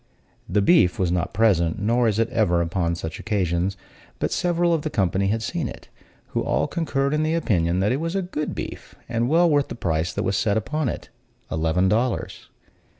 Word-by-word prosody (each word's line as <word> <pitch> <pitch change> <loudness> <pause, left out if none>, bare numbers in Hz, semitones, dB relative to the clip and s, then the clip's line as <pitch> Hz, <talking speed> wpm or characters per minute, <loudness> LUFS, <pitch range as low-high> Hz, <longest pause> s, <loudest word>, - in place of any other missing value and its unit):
The 100 +3 +2
beef 130 - +4
was 90 -2 +1
not 90 -1 -1
present, 95 -6 +2
nor 115 +3 +2
is 105 -2 +1
it 115 0 +2
ever 105 -7 +2
upon 85 -1 -1
such 80 -1 -6
occasions; 95 -3 -1 0.4
but - - -1
several 175 -1 +1
of 160 - +1
the 155 - -3
company 95 - +1
had 110 +3 0
seen - - -2
it, - - -10 0.4
who - - -1
all - - +1
concurred 140 -4 -1
in 150 - +1
the 155 +1 +1
opinion 90 - +1
that 100 - +2
it 130 - 0
was 165 +3 -3
a 195 - 0
good 150 -4 -4
beef, - - -7
and 120 +1 0
well 170 +3 +5
worth 145 -3 +2
the - - -6
price 85 -5 -1
that - - -2
was 95 - 0
set 100 +1 +1
upon 150 +5 -1
it - - -6 0.4
eleven 80 +4 +1
dollars. 115 +5 -1
110 Hz, 205 wpm, -23 LUFS, 90-145 Hz, 0.4 s, well